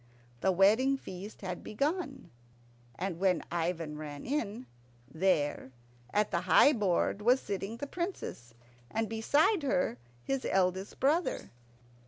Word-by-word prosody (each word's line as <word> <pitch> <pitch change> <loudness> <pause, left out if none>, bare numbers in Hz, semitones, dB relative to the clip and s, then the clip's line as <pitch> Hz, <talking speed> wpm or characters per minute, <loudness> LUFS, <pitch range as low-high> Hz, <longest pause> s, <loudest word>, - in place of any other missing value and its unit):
The 190 - +2
wedding 220 +9 +4
feast 195 -3 -9
had 180 -2 -4
begun, 275 - -2 0.6
and 180 -2 -3
when 185 -3 +2
Ivan 165 -3 -2
ran 145 -2 -7
in, 245 -3 -2 0.4
there, 145 -4 0 0.4
at 210 0 +1
the 170 - +1
high 185 +10 +6
board, 200 -2 +1
was 245 +5 +4
sitting 200 +1 -4
the 285 - -4
Princess, 285 - -5 0.3
and 225 0 -1
beside 285 - +2
her 180 - 0 0.2
his 270 -1 -1
eldest 190 +1 0
brother. 310 +6 +1
200 Hz, 125 wpm, -31 LUFS, 180-265 Hz, 0.6 s, high